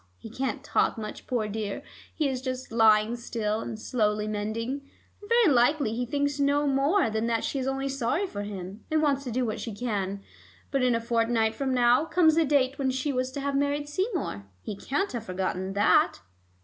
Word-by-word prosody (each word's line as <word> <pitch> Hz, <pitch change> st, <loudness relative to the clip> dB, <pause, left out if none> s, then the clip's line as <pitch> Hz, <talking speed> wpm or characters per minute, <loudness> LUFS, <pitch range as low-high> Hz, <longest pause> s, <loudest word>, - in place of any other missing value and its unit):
He 225 Hz, -, -10 dB
can't 260 Hz, +3 st, -3 dB
talk -, -, +1 dB
much, 215 Hz, -1 st, -7 dB
poor 235 Hz, -4 st, 0 dB
dear; 210 Hz, -1 st, -4 dB, 0.3 s
he 305 Hz, -, 0 dB
is 260 Hz, -2 st, -2 dB
just 255 Hz, -1 st, -4 dB
lying 220 Hz, 0 st, +4 dB
still, 220 Hz, -2 st, -2 dB
and 220 Hz, -, -6 dB
slowly 210 Hz, -3 st, 0 dB
mending, 220 Hz, +6 st, -3 dB, 0.4 s
and 410 Hz, -, -12 dB
very 470 Hz, -5 st, +5 dB
likely 245 Hz, -1 st, +3 dB
he 245 Hz, +1 st, -2 dB
thinks 285 Hz, +2 st, -1 dB
no 285 Hz, +1 st, +2 dB
more 280 Hz, -, +2 dB
than 220 Hz, +1 st, -1 dB
that 230 Hz, -1 st, 0 dB
she 275 Hz, -, -2 dB
is 260 Hz, -, -2 dB
only 270 Hz, 0 st, -1 dB
sorry 275 Hz, +7 st, 0 dB
for 205 Hz, -, -5 dB
him, 200 Hz, 0 st, -7 dB
and 310 Hz, 0 st, +2 dB
wants 280 Hz, -2 st, +2 dB
to 250 Hz, -, -3 dB
do 250 Hz, +2 st, 0 dB
what 215 Hz, -, -3 dB
she 225 Hz, -4 st, -5 dB
can. 200 Hz, -4 st, -2 dB, 0.5 s
But 275 Hz, -2 st, +1 dB
in 250 Hz, -2 st, +3 dB
a -, -, +1 dB
fortnight 230 Hz, -1 st, +1 dB
from 265 Hz, +3 st, -2 dB
now 245 Hz, +3 st, +4 dB
comes 325 Hz, -1 st, +4 dB
the 325 Hz, 0 st, +3 dB
date 275 Hz, -1 st, +2 dB
when 270 Hz, -1 st, +1 dB
she 265 Hz, +2 st, -1 dB
was 255 Hz, 0 st, 0 dB
to 280 Hz, -, -4 dB
have 280 Hz, 0 st, -1 dB
married 285 Hz, +1 st, 0 dB
Seymour. 295 Hz, -, -2 dB, 0.2 s
He 205 Hz, -, -5 dB
can't 290 Hz, -, -2 dB
have 235 Hz, -3 st, -5 dB
forgotten 185 Hz, 0 st, -2 dB
that." 205 Hz, +1 st, +3 dB
250 Hz, 205 wpm, -27 LUFS, 220-280 Hz, 0.5 s, very